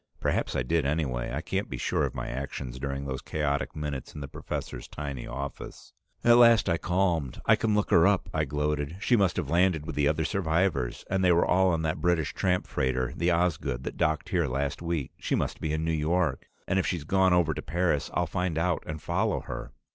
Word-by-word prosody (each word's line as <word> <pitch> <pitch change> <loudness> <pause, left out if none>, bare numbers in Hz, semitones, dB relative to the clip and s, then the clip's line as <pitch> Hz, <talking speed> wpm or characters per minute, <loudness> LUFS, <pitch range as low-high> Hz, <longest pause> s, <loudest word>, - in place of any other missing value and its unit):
Perhaps - - 0
I - - +1
did 80 +5 +1
anyway; 70 -4 -1
I - - -2
can't - - -2
be - - -4
sure - - 0
of - - -5
my - - -4
actions 65 -1 -5
during 70 0 -3
those 65 -2 -4
chaotic 75 -1 -2
minutes 75 -4 -5
in 75 - -6
the 70 - -5
professor's - - -6
tiny 70 -4 -6
office. 70 +1 -7 0.3
At 120 0 +7
last 115 -3 +6
I 85 -2 +1
calmed. 85 -7 0
"I - - +6
can 110 -2 0
look 105 - 0
her 85 +1 +6
up!" 100 -2 +2
I 75 -1 +1
gloated. 75 +2 -1
"She 120 +3 +3
must 100 -5 +2
have 75 -6 -2
landed 85 -3 +2
with - - -5
the 75 -1 +2
other 80 +1 +1
survivors, 80 -8 0
and 95 0 0
they 90 - +5
were 85 0 +4
all 95 +1 +4
on 80 -2 0
that 80 -1 -1
British 85 -3 +1
tramp 90 -1 0
freighter 65 -1 -1
the 85 +1 +1
Osgood, 75 -7 0
that - - -5
docked 80 -1 0
here 90 -6 +1
last 70 +4 -2
week. 85 -6 -2
She - - 0
must - - -2
be 80 - -1
in 80 +1 -1
New 80 - +1
York 80 -2 0 0.2
and 95 +1 +2
if - - 0
she's 85 -5 -2
gone 95 +3 +3
over 85 -3 +3
to - - -5
Paris, 80 -4 0
I'll 90 - +2
find 90 -1 -2
out 85 +1 +1
and 75 0 -4
follow 100 +7 0
her!" - - -7
80 Hz, 225 wpm, -28 LUFS, 70-90 Hz, 0.3 s, At